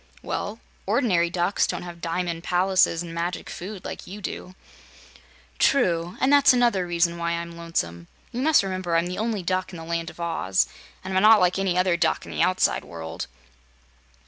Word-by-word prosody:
"Well, 210 Hz, +3 st, -4 dB, 0.3 s
ordinary 200 Hz, -7 st, +2 dB
ducks 175 Hz, +3 st, +1 dB
don't -, -, -3 dB
have 175 Hz, -1 st, -9 dB
diamond 170 Hz, 0 st, -2 dB
palaces 180 Hz, -2 st, +2 dB
an' 170 Hz, -1 st, -8 dB
magic 170 Hz, +1 st, -3 dB
food, 190 Hz, +1 st, -7 dB
like -, -, -7 dB
you 200 Hz, +3 st, -8 dB
do." 185 Hz, -2 st, -6 dB, 1.0 s
"True; 175 Hz, -9 st, +2 dB
and 265 Hz, +2 st, +3 dB
that's 285 Hz, -2 st, +7 dB
another 235 Hz, -7 st, +2 dB
reason 170 Hz, 0 st, +1 dB
why 170 Hz, 0 st, -1 dB
I'm 170 Hz, 0 st, -5 dB
lonesome. 85 Hz, -, -3 dB, 0.2 s
You 250 Hz, +1 st, -3 dB
must 310 Hz, -4 st, +4 dB
remember 185 Hz, -3 st, -2 dB
I'm 165 Hz, +1 st, +3 dB
the 180 Hz, +2 st, -4 dB
only 220 Hz, -3 st, -1 dB
Duck 185 Hz, +1 st, -1 dB
in 180 Hz, -, -8 dB
the 165 Hz, -, -8 dB
Land 165 Hz, 0 st, -2 dB
of -, -, -15 dB
Oz, 165 Hz, -, 0 dB, 0.4 s
and 190 Hz, 0 st, -4 dB
I'm 190 Hz, -, +4 dB
not 215 Hz, +1 st, +8 dB
like 180 Hz, +1 st, +2 dB
any 190 Hz, -2 st, 0 dB
other 180 Hz, -1 st, +3 dB
duck -, -, +1 dB
in -, -, -9 dB
the -, -, -2 dB
outside 185 Hz, 0 st, +2 dB
world." 80 Hz, -1 st, -7 dB
180 Hz, 185 wpm, -25 LUFS, 170-195 Hz, 1.0 s, not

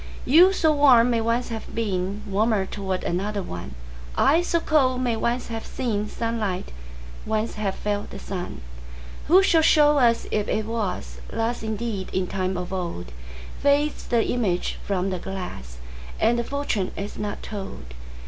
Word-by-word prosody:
You, 345 Hz, +7 st, +7 dB
so 320 Hz, -5 st, +3 dB
warm, 255 Hz, -5 st, +6 dB
may 230 Hz, -1 st, +2 dB
once 230 Hz, +2 st, 0 dB
have 225 Hz, -1 st, -5 dB
beenWarmer 200 Hz, 0 st, -1 dB
towards 190 Hz, -2 st, -3 dB
another 200 Hz, +3 st, -1 dB
one:I, -, -, -1 dB
so 340 Hz, -1 st, +1 dB
cold, 265 Hz, -6 st, +2 dB
may 240 Hz, -2 st, +1 dB
once 235 Hz, +2 st, -1 dB
have 225 Hz, -1 st, -4 dB
seenSunlight, 215 Hz, -3 st, -2 dB, 0.5 s
once 220 Hz, +1 st, -1 dB
have 200 Hz, -2 st, -2 dB
felt 205 Hz, -1 st, -2 dB
the -, -, -8 dB
sun:Who -, -, -2 dB
shall 330 Hz, -4 st, +4 dB
show 295 Hz, -2 st, +5 dB
us 235 Hz, -2 st, +3 dB
if 210 Hz, -1 st, 0 dB
it 215 Hz, 0 st, 0 dB
wasThus 220 Hz, -, -3 dB
indeed 220 Hz, -3 st, -3 dB
in 185 Hz, 0 st, +1 dB
time 185 Hz, 0 st, -2 dB
of 180 Hz, +1 st, -4 dB
old? 170 Hz, -, -4 dB, 0.5 s
Fades 285 Hz, +1 st, +1 dB
the 235 Hz, -2 st, +2 dB
image 200 Hz, -8 st, -1 dB
from 195 Hz, -1 st, -1 dB
the 185 Hz, -, -2 dB
glass, 170 Hz, -, -7 dB, 0.4 s
And 235 Hz, +1 st, +3 dB
the -, -, 0 dB
fortune 255 Hz, -8 st, -2 dB
is 200 Hz, +1 st, -5 dB
not 210 Hz, -1 st, -4 dB
told. 195 Hz, -, -7 dB
210 Hz, 145 wpm, -24 LUFS, 185-240 Hz, 0.5 s, You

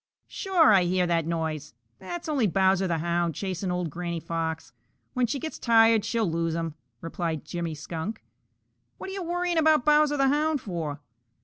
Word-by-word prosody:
"Sure, 360 Hz, -, +3 dB
I 185 Hz, -3 st, +5 dB
hear 180 Hz, +1 st, +1 dB
that 165 Hz, -2 st, 0 dB
noise. 160 Hz, -5 st, -3 dB, 0.2 s
That's 330 Hz, -, -6 dB
only 275 Hz, -8 st, +2 dB
Bowser 190 Hz, 0 st, +2 dB
the 170 Hz, -2 st, 0 dB
Hound 170 Hz, 0 st, -1 dB
chasing 190 Hz, 0 st, -3 dB
old 180 Hz, -3 st, -2 dB
Granny 170 Hz, +1 st, -4 dB
Fox. 160 Hz, -4 st, -4 dB, 0.4 s
When 250 Hz, -1 st, +1 dB
she 280 Hz, -, -2 dB
gets 315 Hz, +4 st, -6 dB
tired 225 Hz, -2 st, +5 dB
she'll 230 Hz, -2 st, 0 dB
lose 165 Hz, 0 st, -1 dB
him," 165 Hz, -2 st, -3 dB, 0.3 s
replied 165 Hz, -2 st, -3 dB
Jimmy 170 Hz, -2 st, -4 dB
Skunk. 160 Hz, +7 st, -6 dB, 0.7 s
"What 385 Hz, -, -7 dB
are -, -, -6 dB
you 390 Hz, -, -4 dB
worrying 350 Hz, 0 st, 0 dB
about 310 Hz, -4 st, +4 dB
Bowser 300 Hz, -1 st, +4 dB
the 275 Hz, -1 st, +3 dB
Hound 300 Hz, +1 st, +1 dB
for?" 160 Hz, -, -5 dB
180 Hz, 175 wpm, -26 LUFS, 165-275 Hz, 0.7 s, I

